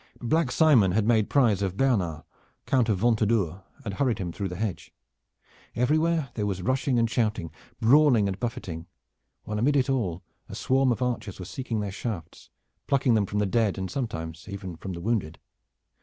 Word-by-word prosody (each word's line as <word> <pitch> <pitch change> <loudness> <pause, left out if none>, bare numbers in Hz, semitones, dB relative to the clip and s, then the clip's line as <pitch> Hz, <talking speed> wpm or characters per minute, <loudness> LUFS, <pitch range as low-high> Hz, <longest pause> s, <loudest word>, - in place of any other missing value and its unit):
Black 155 +2 +1
Simon 125 - +5
had 105 +1 +2
made 110 -2 +3
prize 115 -9 +3
of 95 -1 -2
Bernard, 100 - +1 0.4
Count 125 -4 +2
of 105 - +2
Ventadour, 105 -5 +1 0.2
and 100 - -3
hurried 125 +1 +1
him 90 -5 -4
through 100 +3 -3
the 90 - -6
hedge. 105 -1 -4 0.8
Everywhere 155 +3 +1
there 105 -2 -2
was 95 -2 -3
rushing 130 +1 +1
and 115 0 +3
shouting, 105 -8 -1 0.3
brawling 125 -3 +5
and 95 -1 -3
buffeting, 90 -9 -5 0.6
while 105 0 -3
amidst 140 +5 +3
it 135 0 +1
all 95 -10 -1 0.3
a - - -7
swarm 135 0 +2
of 120 +2 -1
archers 120 -5 -3
were 90 - -7
seeking 115 +1 -3
their 100 -1 -3
shafts, 95 -5 -6 0.4
plucking 135 -3 +3
them 105 -3 +2
from 105 - -3
the 105 - +2
dead, 105 0 +1
and 95 -1 -4
sometimes 85 -10 -5
even 95 -3 -6
from 95 +3 -6
the 85 - -6
wounded. 100 -7 -1
110 Hz, 180 wpm, -26 LUFS, 95-125 Hz, 0.8 s, Simon